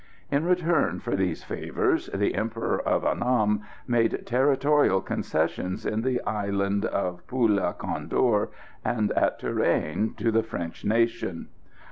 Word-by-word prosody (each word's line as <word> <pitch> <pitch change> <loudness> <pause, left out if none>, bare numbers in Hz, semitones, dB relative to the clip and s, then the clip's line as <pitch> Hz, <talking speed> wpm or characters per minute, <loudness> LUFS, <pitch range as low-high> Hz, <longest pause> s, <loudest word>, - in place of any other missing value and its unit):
In 140 +3 +1
return 170 - +2
for - - -2
these 90 -4 -1
favours - - -1
the 100 +1 0
Emperor 115 +1 -1
of - - 0
Annam 105 -4 +2 0.3
made 115 -2 +1
territorial 135 -3 +3
concessions 95 -1 -2
in 110 +1 0
the 125 0 0
Island 100 -1 0
of 90 -3 -2
Poula 115 -6 +1
Condor 105 -5 0 0.3
and 110 -4 0
at - - +2
Tourane 105 +8 0
to 115 - +1
the 115 +1 +3
French 85 -7 -6
nation. 115 -5 0
110 Hz, 125 wpm, -26 LUFS, 100-125 Hz, 0.3 s, territorial